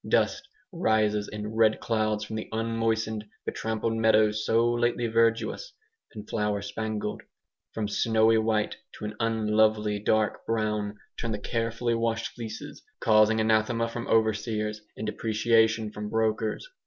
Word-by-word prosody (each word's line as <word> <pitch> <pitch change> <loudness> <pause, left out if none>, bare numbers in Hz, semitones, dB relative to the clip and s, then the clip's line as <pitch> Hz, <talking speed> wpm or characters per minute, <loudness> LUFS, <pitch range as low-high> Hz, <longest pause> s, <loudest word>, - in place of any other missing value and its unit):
Dust 275 -1 +1 0.2
rises 110 - +1
in 105 +1 -6
red 110 -1 +3
clouds 110 -2 0
from 110 +1 -6
the 110 - -5
unmoistened, 115 -1 -1 0.2
betrampled 110 0 -2
meadows 110 -1 +3
so 115 +2 +3
lately 120 0 +1
verdurous 115 - +1 0.4
and 105 -1 -8
flower 105 -2 -1
spangled. 105 +1 -3 0.5
From 110 -2 -1
snowy 110 +1 +3
white 110 -1 0 0.2
to - - -7
an 105 - -4
unlovely 110 -2 +2
dark 105 +1 +1
brown 105 -2 -1 0.2
turn 115 - -2
the 105 - -1
carefully 115 +2 -1
washed 115 0 -1
fleeces, 110 -2 -8 0.2
causing 110 0 +4
anathema 110 +1 +2
from 115 0 -5
overseers 110 -1 0 0.2
and - - -4
depreciation 110 0 +2
from 105 0 -6
brokers. 110 - -1
110 Hz, 130 wpm, -27 LUFS, 105-115 Hz, 0.5 s, causing